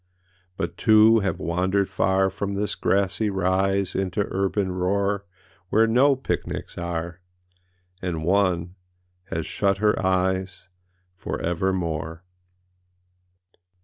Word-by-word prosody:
âBut - - -4
two 110 0 +6
have 95 -5 -1
wandered 95 +4 0
far 95 0 +1
From 100 0 -3
this 105 +1 -1
grassy 100 +2 0
rise 95 0 0
Into 95 +1 -1
urban 95 0 0
roar 100 +2 -1 0.4
Where 110 +1 +4
no 130 +5 +4
picnics 130 - -4
are, 85 0 -4 0.8
And 85 -4 -3
oneâhas 90 -1 +1 0.7
shut 100 +4 0
her 105 0 +1
eyes 95 0 0 0.5
For - - -5
evermore. 85 -2 -2
95 Hz, 100 wpm, -24 LUFS, 90-100 Hz, 0.8 s, two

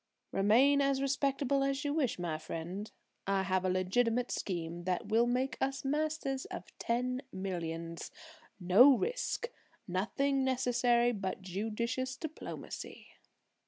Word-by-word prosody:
"Remain 250 +9 +4
as 275 -1 +2
respectable 275 0 +1
as 275 +1 -1
you 290 - 0
wish, 290 -6 0
my 170 -3 -2
friend; 175 +7 -5 0.4
I 195 -1 +2
have 185 -1 +1
a 185 - +1
legitimate 230 +7 +1
scheme 170 -2 -3
that 185 +2 -1
will 230 +2 +4
make 250 0 0
us 270 0 -1
masters 295 -2 -1
of - - -8
ten 250 +2 -1
millions! 170 -3 -4 0.5
No 225 +10 +7
risk; 485 - -2 0.4
nothing 265 +9 0
necessary 245 -2 +3
but 195 -3 -4
judicious 230 +7 -2
diplomacy." 315 +2 -7
240 Hz, 125 wpm, -33 LUFS, 190-270 Hz, 0.5 s, No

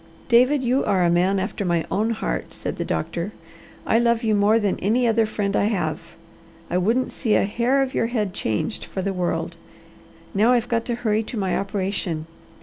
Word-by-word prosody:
"David, 255 +4 +4
you 255 +2 +2
are 195 -3 +2
a 170 - +3
man 180 +3 +2
after 200 +2 -2
my 170 -3 0
own 215 +3 +1
heart," 135 - -3
said - - -5
the - - -2
doctor. 170 - -3 0.5
"I 225 - +3
love 235 0 +2
you 220 -1 +2
more 205 +2 +4
than 205 -4 0
any 235 +5 +2
other 225 -1 +3
friend 200 -2 -2
I - - +2
have 175 -7 -1 0.7
I 180 - +2
wouldn't 230 +8 +1
see 225 -5 0
a - - +3
hair 245 +6 +1
of 265 - -4
your 230 - +1
head 215 -5 -2
changed 110 - -2
for 190 - -5
the 195 0 -1
world. 180 -1 -2 0.8
Now 220 +5 +4
I've 240 -1 +1
got 230 -1 0
to 240 - -1
hurry 220 -2 0
to 225 +1 -6
my 190 -3 0
operation. 190 -5 -2
210 Hz, 200 wpm, -23 LUFS, 185-235 Hz, 0.8 s, David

